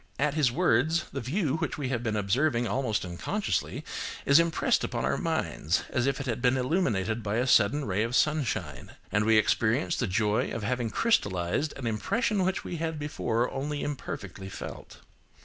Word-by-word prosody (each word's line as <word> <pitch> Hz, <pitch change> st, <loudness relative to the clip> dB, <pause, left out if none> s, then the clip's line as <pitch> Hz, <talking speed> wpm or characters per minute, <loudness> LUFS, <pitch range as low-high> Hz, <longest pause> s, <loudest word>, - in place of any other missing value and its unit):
At 145 Hz, 0 st, +1 dB
his 150 Hz, -6 st, +2 dB
words, 160 Hz, +2 st, +2 dB
the -, -, -3 dB
view 150 Hz, -, 0 dB
which -, -, -2 dB
we 140 Hz, -4 st, -2 dB
have 120 Hz, -3 st, -1 dB
been 110 Hz, -3 st, -1 dB
observing 120 Hz, +5 st, +1 dB
almost 125 Hz, -7 st, -1 dB
unconsciously, 140 Hz, -, -2 dB, 0.4 s
is 140 Hz, +3 st, +7 dB
impressed 170 Hz, -2 st, +2 dB
upon -, -, -2 dB
our -, -, +1 dB
minds 80 Hz, +4 st, -1 dB
as 120 Hz, +1 st, +1 dB
if 140 Hz, -, 0 dB
it 135 Hz, -, -4 dB
had 120 Hz, -2 st, -2 dB
been 125 Hz, +1 st, +3 dB
illuminated 115 Hz, -, 0 dB
by 105 Hz, 0 st, -2 dB
a 120 Hz, +2 st, +1 dB
sudden 130 Hz, +3 st, +4 dB
ray 100 Hz, -1 st, 0 dB
of 115 Hz, +2 st, -1 dB
sunshine, 110 Hz, -, 0 dB, 0.2 s
and 105 Hz, 0 st, +2 dB
we 110 Hz, 0 st, +5 dB
experience 110 Hz, -, +2 dB
the -, -, -1 dB
joy 105 Hz, +2 st, +1 dB
of 115 Hz, -, -4 dB
having 120 Hz, +1 st, -1 dB
crystallised 105 Hz, -, +1 dB
an 135 Hz, -, -6 dB
impression 195 Hz, -, 0 dB
which 190 Hz, +1 st, -1 dB
we 175 Hz, -, -5 dB
had 160 Hz, -1 st, -2 dB
before 125 Hz, -5 st, -1 dB
only 145 Hz, +2 st, -3 dB
imperfectly 100 Hz, -, -5 dB
felt. -, -, -8 dB
125 Hz, 180 wpm, -28 LUFS, 110-150 Hz, 0.4 s, is